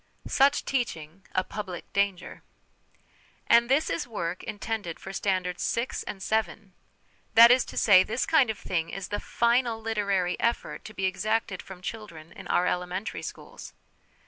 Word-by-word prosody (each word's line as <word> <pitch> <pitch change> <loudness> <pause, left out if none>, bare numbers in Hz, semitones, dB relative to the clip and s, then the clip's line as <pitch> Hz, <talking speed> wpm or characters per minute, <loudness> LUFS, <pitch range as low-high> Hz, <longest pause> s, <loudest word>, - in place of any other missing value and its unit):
Such 280 +1 +3
Teaching 190 - -3
a 185 - +2
Public 185 -3 -7
Danger. 200 -2 -1 1.0
And 235 +1 +5
this 280 +4 +3
is 295 - -2
work 180 -6 -4
intended 205 -5 -4
for 190 - -8
Standards 185 -2 -1
VI. 235 +2 -1 0.2
and 190 -2 -6
VII.! 215 -2 -1 0.6
That 230 +1 +10
is 255 0 +5
to - - -10
say, 200 -4 +7
this 220 +6 -1
kind 295 -7 +4
of 220 - -2
thing 165 -4 -2
is 195 -1 -6
the 205 - -2
final 235 -1 +1
literary 200 -5 -1
effort 235 0 -1
to 215 - -10
be 190 - -1
exacted 195 +1 -1
from 185 -1 -12
children 175 -8 -8
in - - -11
our 180 - +2
elementary 180 +3 -2
schools - - -9
205 Hz, 155 wpm, -27 LUFS, 185-230 Hz, 1.0 s, That